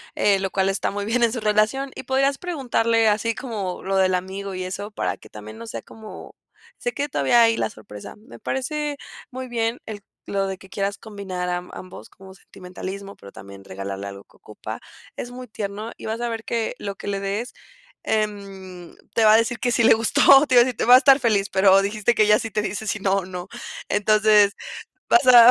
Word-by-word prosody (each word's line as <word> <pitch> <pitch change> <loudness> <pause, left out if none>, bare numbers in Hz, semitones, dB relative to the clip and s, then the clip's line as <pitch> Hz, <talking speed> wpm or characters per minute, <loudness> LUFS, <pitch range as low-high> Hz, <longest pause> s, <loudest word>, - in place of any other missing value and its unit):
eh, 200 -1 +3
lo 195 0 -2
cual 190 0 0
está 195 - -1
muy 205 0 -4
bien 235 +3 0
en 235 -1 +3
su 240 - -4
relación. 215 +6 +1
Y - - -7
podrías 275 +1 +1
preguntarle, 240 -9 +1
así 220 +2 +1
como 205 -8 -5
lo 195 0 -1
del 185 -1 +3
amigo 190 +2 -5
y 185 - -4
eso, 195 +3 -5
para 215 - -2
que - - -16
también 110 +1 -10
no 115 - -9
sea 115 0 -6
como, 220 -1 -11 0.5
se 485 - -2
quede 285 -5 -3
todavía 190 - +4
hay 230 0 +3
la - - -1
sorpresa. 105 - -11
Me 215 +4 -15
parece 295 +2 -3 0.3
muy 260 -1 -7
bien 230 0 -1
el 210 -2 -7 0.3
lo 195 -1 0
de 190 -1 -4
que 190 - -15
quieras 200 +1 -3
combinar 195 -4 -6
a 180 - 0 0.2
ambos 185 -1 -10
como 190 0 -15
sentimentalismo, 195 +1 -9
pero 100 - -14
también 100 0 -12
regalarle 100 +1 -6
algo 100 0 -10
que - - -27
ocupa. - - -9 0.4
Es 245 - -6
muy 250 0 -9
tierno 210 +1 -5
y - - -11
vas 220 +1 -3
a 240 - -2
ver 225 -1 -4
que 230 0 -2
lo 200 -1 -5
que - - -10
le 200 -1 -2
des, 205 +5 -3 0.5
em, 195 -4 -4 0.2
te 225 - +2
va 215 0 +7
a - - +7
decir 230 +1 0
que 245 - 0
sí 235 - +2
le - - +7
gustó, 270 +5 +5
te 260 -3 +1
iba 240 - +8
a - - -1
decir, 250 -2 -3
te - - -2
va 245 +2 +8
a - - +11
estar 275 +1 +6
feliz, 205 -4 +2
pero 190 0 +5
dijiste 210 +3 0
que 215 -2 +3
ya 210 0 +5
si 225 - -5
te 210 - 0
dice 210 +2 -4
si 210 - -1
no, 195 0 +1
no. 180 -1 -7 0.4
Entonces, 210 0 +4 0.6
vas 355 -6 +4
a 245 -1 +9
210 Hz, 220 wpm, -23 LUFS, 190-235 Hz, 0.6 s, a